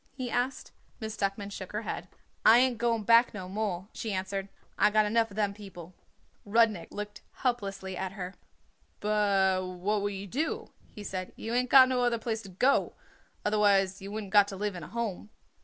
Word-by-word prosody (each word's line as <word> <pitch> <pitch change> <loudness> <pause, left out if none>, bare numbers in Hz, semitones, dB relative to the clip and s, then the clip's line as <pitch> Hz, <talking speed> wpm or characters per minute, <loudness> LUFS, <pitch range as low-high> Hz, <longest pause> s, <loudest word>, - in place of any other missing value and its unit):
he 250 -3 -4
asked. 250 +2 -2 0.3
Miss 220 -2 -5
Duckman 200 0 -2
shook 190 -1 -7
her 210 +2 -2
head. - - -5 0.4
"I 225 - +8
ain't 250 -2 +3
going 230 -2 +1
back 230 +2 +5
no 185 -3 -6
more," 195 -2 -3
she 220 - -4
answered. 195 +1 -3 0.3
"I 210 - +4
got 215 0 +3
enough 225 +2 +2
of 200 - -12
them 205 -2 0
people." 190 -4 -11 0.5
Rudnik 215 -3 +2
looked 210 0 -6
helplessly 195 -6 -2
at 190 +1 -4
her. 185 -2 -6 0.7
"But 200 -3 +2
what 185 +3 -1
would 205 0 -1
you 195 +1 -6
do?" 280 - -3 0.2
he 210 - -10
said. 185 -2 -5
"You 225 - -5
ain't 250 0 +1
got 260 -1 +9
no 255 -1 +1
other 240 -1 +2
place 225 -1 -3
to 195 - -11
go 250 +10 +3
to, - - -17 0.5
otherwise 200 -2 +3
you 195 +1 -7
wouldn't 210 -2 -6
got 205 -1 +7
to 200 - -6
live 205 +1 -2
in 175 - -6
a 150 - -8
Home." 220 -4 -4
210 Hz, 195 wpm, -29 LUFS, 195-225 Hz, 0.7 s, got